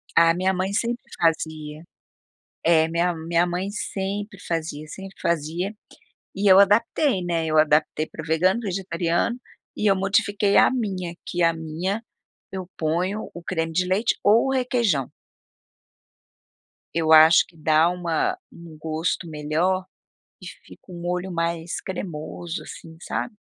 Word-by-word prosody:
A 165 0 +6
minha 185 +2 +1
mãe 190 +2 -2
sempre 235 +2 -1 0.2
fazia, 155 -1 -1 0.8
é 160 -1 +4
minha 170 +1 0
minha 165 +2 +1
mãe 180 +2 -2
sempre 205 0 -4
fazia 155 -2 -3
sempre 195 +3 -9
fazia, 170 +5 -1 0.6
e 195 +1 +2
eu 190 - +9
adaptei, 205 +3 +3
né, 165 -2 -1
eu 155 0 +2
adaptei 155 0 +2
para 155 - -9
o 155 - -11
vegano, 185 +8 +2
vegetariano 185 +2 -1 0.4
e 210 - -1
eu - - +5
modifiquei 200 +1 +1
a - - +6
minha, 190 -8 -3
que 175 0 -1
a 165 0 +4
minha 165 +7 -3 0.5
eu 185 -2 -5
ponho 180 +7 -1
o 175 - -8
creme 165 -2 -2
de 180 +3 +1
leite 195 +5 +1
ou 220 +5 +5
o - - +1
requeijão. 235 - +1 1.8
Eu 160 -1 +1
acho 160 +1 +8
que 170 - -22
dá 155 +1 +3
uma 180 - -1
um 170 -2 -13
gosto 160 +2 -2
melhor 160 +5 0 0.6
e - - -9
fica 185 - -13
um 175 - -8
molho 180 +2 -3
mais 170 0 -2
cremoso 175 -2 -6
assim, 160 0 -11
sabe? 225 +5 -4
175 Hz, 145 wpm, -24 LUFS, 160-195 Hz, 1.8 s, eu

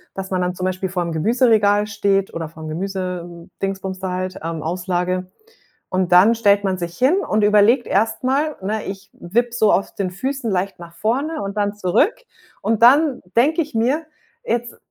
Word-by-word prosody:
dass 190 0 -6
man 185 - 0
dann 180 0 -1
zum 185 - -3
Beispiel 185 0 -2
vorm 175 -2 -2
Gemüseregal 210 +2 +3
steht 200 -2 0
oder 165 -1 -4
vorm 160 -1 -10
Gemüse-Dingsbums 185 +1 -5
da 190 -1 -3
halt 185 0 -4
ähm, 165 -1 -4
Auslage. 180 +1 -2 0.6
Und 185 -1 0
dann 195 +6 +7
stellt 205 -3 +3
man 190 -2 0
sich 170 -1 -5
hin 265 +8 +3
und 215 - 0
überlegt 210 +4 +4
erst 220 +4 0
mal 285 +4 +1
ne, 210 +2 -3
ich 195 0 -7
wippe 235 +7 -1
so 220 -3 +3
auf 195 - 0
den 190 -2 -2
Füßen 260 +4 -3
leicht 185 0 -2
nach 170 -1 -11
vorne 265 - -1
und 200 +1 -5
dann 205 0 0
zurück. 210 - +2 0.5
Und 225 0 0
dann 280 +2 +5
denke 300 +8 +3
ich 300 -4 -6
mir 265 +8 +1 0.4
jetzt, 235 +1 -2
195 Hz, 175 wpm, -20 LUFS, 180-230 Hz, 0.6 s, dann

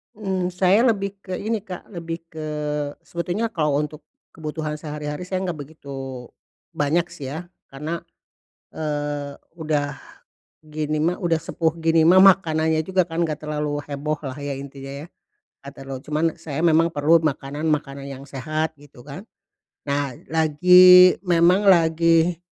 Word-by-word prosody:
Mmm, 190 -4 -2
saya 190 +6 +3
lebih 200 -3 -1
ke 185 -2 -6
ini 220 +3 -2
Kak, 185 -3 -10
lebih 165 -2 -6
ke 155 -1 -6 0.6
sebetulnya 180 +7 -3
kalau 150 -4 +1
untuk 150 0 -8 0.3
kebutuhan 155 -1 -5
sehari-hari 150 +2 -6
saya 185 0 -2
enggak 170 -5 -4
begitu, 135 -4 -8 0.4
banyak 150 +4 +1
sih 135 - -8
ya, 175 +2 -7 0.2
karena, 155 +5 -5 0.7
eee, 145 -2 -3 0.2
udah 150 -3 -2 0.6
gini 155 0 -3
mah, 175 +3 +1
udah 170 -3 0
sepuh 165 0 -1
gini 165 0 +3
mah 185 +2 +7
makanannya 160 -5 +4
juga 185 0 +2
kan 170 0 -1
enggak 155 -2 -4
terlalu 150 -1 -2
heboh 150 +1 -3
lah 135 -1 -6
ya. 145 -1 -4
intinya 140 +1 -8
ya. - - -16 0.6
Gak 140 - -9
terlalu 135 0 -6
cuman, 155 +2 -1
saya 150 -1 -5
memang 165 0 +3
perlu 160 +3 +3
makanan-makanan 145 -1 -2
yang 135 0 -8
sehat, 155 +4 -3
gitu 145 -3 -17
kan. 145 - -10 0.6
Nah, 140 -3 -2
lagi 180 +3 +7
memang 180 +1 +4
lagi, 165 -2 +3
155 Hz, 140 wpm, -22 LUFS, 145-175 Hz, 0.7 s, mah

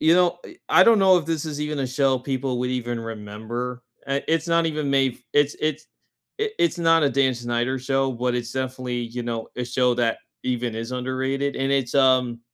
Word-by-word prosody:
you 160 +1 +5
know, 180 -1 +3
eh - - -11
I 180 +3 +7
don't 230 -2 +6
know 190 -2 +6
if 165 - -6
this 165 -2 -1
is 150 -2 -5
even 150 0 -2
a 135 - 0
show 130 0 +1
people 130 -1 -2
would 125 0 -1
even 120 -2 -2
remember, 115 +3 -6 0.2
and 140 0 -1
it's 165 +1 +1
not 165 0 +3
even 150 -3 -2
made 135 -2 +2
f - - -22
it's 145 0 +2
it's 155 0 -2 0.5
i 440 - +1
it's 345 - +1
not 165 -1 +4
a 145 - +3
Dan 135 -2 +2
Snyder 120 +2 -1
show, 135 +1 0
but 125 0 -1
it's 120 -1 -3
definitely, 130 -2 -3
you 120 +1 -5
know, 115 -1 -4
a 125 - -2
show 125 0 +1
that 120 -2 0 0.3
even 120 -2 -1
is 115 +2 -5
underrated, 130 +2 -2
and 135 0 -1
it's 135 -3 0
um 130 -3 +3
130 Hz, 215 wpm, -23 LUFS, 120-145 Hz, 0.5 s, I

